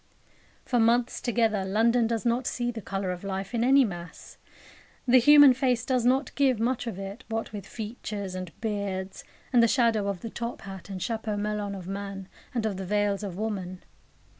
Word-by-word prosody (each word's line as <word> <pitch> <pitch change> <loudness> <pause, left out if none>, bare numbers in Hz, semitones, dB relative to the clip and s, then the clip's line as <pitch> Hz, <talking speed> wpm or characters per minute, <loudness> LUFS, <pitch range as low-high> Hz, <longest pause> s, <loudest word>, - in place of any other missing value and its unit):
For 245 - +1
months 235 +2 +2
together 225 -4 +1
London 225 +4 +2
does 230 0 -2
not 240 +2 +1
see 240 -1 -1
the 225 -2 -7
colour 195 -1 -3
of 180 +1 -6
life 195 +1 -4
in 230 -1 +1
any 270 +1 +6
mass. 175 -4 -8 0.7
The 255 +1 +7
human 290 +1 +8
face 250 -2 0
does 255 -3 +1
not 265 +2 +2
give 265 -5 +2
much 240 +1 0
of 215 -5 -4
it, 195 +5 -7
what 225 0 -3
with 205 -3 -7
features, 210 -3 -6
and 185 -2 -5
beards, 200 -3 -3 0.3
and 240 - +6
the 230 - +5
shadow 230 -4 +2
of 195 -3 -3
the 230 - -6
top 235 0 -5
hat 195 0 -9
and 190 -1 -5
chapeau 220 0 -2
melon 205 -1 -2
of 185 -2 -8
man, 195 -1 -5 0.2
and 235 -3 -2
of 205 -3 -1
the 190 - -5
veils 205 0 +1
of 195 -4 -5
woman. 190 -4 -4
215 Hz, 190 wpm, -27 LUFS, 195-240 Hz, 0.7 s, human